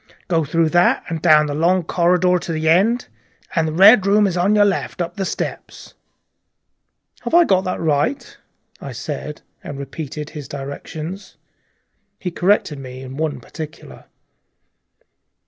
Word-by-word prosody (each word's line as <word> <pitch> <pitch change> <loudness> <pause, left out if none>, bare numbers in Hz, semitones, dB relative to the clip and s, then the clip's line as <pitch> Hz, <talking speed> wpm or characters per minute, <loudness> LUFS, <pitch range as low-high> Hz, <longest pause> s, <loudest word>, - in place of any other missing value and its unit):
Go 165 -2 +1
through 160 +2 +1
that, 175 +2 +3
and 165 -2 -4
down 155 -3 +5
the 145 - -3
long 175 +4 +2
corridor 180 +1 +2
to 170 - -6
the 160 0 -2
end, 205 +9 +3 0.5
and 165 -2 +2
the - - -2
Red 195 +4 +6
Room 205 +1 +4
is 190 -3 -1
on 185 +4 +2
your 205 -1 +5
left 195 -2 -2
up 175 +3 -3
the 195 -2 -2
steps." - - -6 1.3
"Have - - -1
I 345 - +8
got 190 - +2
that 185 - -2
right?" 160 - -1 0.5
I 135 - -7
said, 145 +4 -6 0.2
and 145 - -7
repeated 150 +2 -7
his 150 -4 -8
directions. 155 +7 -7 0.8
He 180 - -4
corrected 175 -5 +1
me 130 -1 -9
in 130 0 -9
one 150 -2 -2
particular. 155 +5 -10
165 Hz, 150 wpm, -20 LUFS, 150-185 Hz, 1.3 s, I